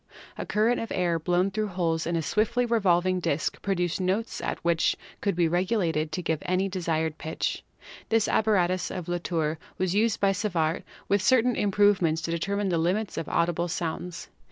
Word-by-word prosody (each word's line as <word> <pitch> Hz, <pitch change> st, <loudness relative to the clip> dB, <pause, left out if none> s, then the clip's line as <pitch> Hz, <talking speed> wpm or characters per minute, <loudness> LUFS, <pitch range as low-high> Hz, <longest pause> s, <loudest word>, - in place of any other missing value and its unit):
A -, -, -6 dB
current 220 Hz, +4 st, +2 dB
of 230 Hz, -, -5 dB
air 175 Hz, -2 st, +1 dB
blown 180 Hz, +3 st, +1 dB
through 215 Hz, +1 st, -1 dB
holes 165 Hz, -4 st, -1 dB
in 170 Hz, -, 0 dB
a 165 Hz, -, 0 dB
swiftly 235 Hz, +8 st, +1 dB
revolving 185 Hz, -5 st, +2 dB
disk 155 Hz, -3 st, -1 dB
pro 195 Hz, -1 st, 0 dB
duced 175 Hz, 0 st, -1 dB
notes 195 Hz, +5 st, -1 dB, 0.2 s
which 170 Hz, -1 st, +2 dB, 0.2 s
could 200 Hz, -3 st, 0 dB
be 170 Hz, -1 st, +3 dB
regulated 170 Hz, -3 st, 0 dB
to 180 Hz, +3 st, -3 dB
give 160 Hz, -2 st, -1 dB
any 185 Hz, +2 st, 0 dB
desired 160 Hz, -4 st, -2 dB
pitch. 160 Hz, -, -2 dB, 0.5 s
This 225 Hz, -1 st, +3 dB
apparatus 185 Hz, -4 st, +2 dB
of 180 Hz, -3 st, -5 dB
Latoirr 165 Hz, -3 st, -1 dB, 0.2 s
was 185 Hz, -1 st, 0 dB
used 220 Hz, +2 st, +2 dB
by 195 Hz, -1 st, +3 dB
Savart 180 Hz, -5 st, 0 dB, 0.3 s
with 200 Hz, 0 st, +2 dB
certain 250 Hz, +2 st, +3 dB
improvements 195 Hz, -6 st, +2 dB
to 165 Hz, -, -2 dB
determine 200 Hz, +4 st, -1 dB
the 170 Hz, -2 st, +1 dB
limits 190 Hz, +5 st, 0 dB
of 160 Hz, -, -4 dB
audible 170 Hz, +1 st, +1 dB
Sound 165 Hz, 0 st, -1 dB
Vibration -, -, -6 dB
Measurement. 180 Hz, -, -10 dB
sounds. -, -, -9 dB
180 Hz, 185 wpm, -27 LUFS, 165-205 Hz, 0.5 s, be